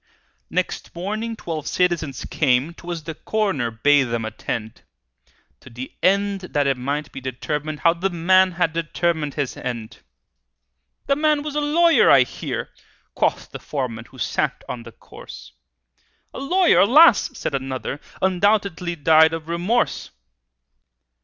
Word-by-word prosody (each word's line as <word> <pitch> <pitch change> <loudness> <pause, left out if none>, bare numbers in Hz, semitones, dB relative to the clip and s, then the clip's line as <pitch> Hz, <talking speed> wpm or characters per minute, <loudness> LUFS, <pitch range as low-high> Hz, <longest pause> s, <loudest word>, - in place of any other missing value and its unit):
Next 180 -1 -3
morning 215 +6 -3
twelve 160 -7 -5
citizens 165 -7 -1
came 140 +2 +1
('Twas 170 -1 -7
the 160 - -6
coroner 190 - -1
bade 135 +5 +3
them 115 -1 -2
attend), 110 0 -5 0.8
To - - -14
the 125 +2 -8
end 200 +1 +2
that 145 -6 -1
it 135 -1 +2
might 140 +4 -3
be 135 - -8
determined 150 +4 -4
How 165 - +5
the 180 +3 -2
man 185 +2 +3
had 170 -2 0
determined 165 -2 -1
his 145 -4 -2
end! 120 -3 -6 1.1
"The 275 - +2
man 300 0 +1
was 300 -1 -5
a 300 - 0
lawyer, 330 +3 +4
I - - +7
hear," - - -5 0.4
Quoth - - -1
the - - -7
foreman 125 -6 -4
who 130 - -17
sat 120 - -2
on 120 - -5
the 115 - -11
corse. - - -13 0.8
"A - - -7
lawyer? 355 +7 +3
Alas!" 265 +4 +6
said - - -3
another, 135 +1 -4 0.2
"Undoubtedly 190 -2 +1
died 160 +1 +5
of 165 -1 -5
remorse!" 175 +8 -1
165 Hz, 140 wpm, -22 LUFS, 135-195 Hz, 1.1 s, I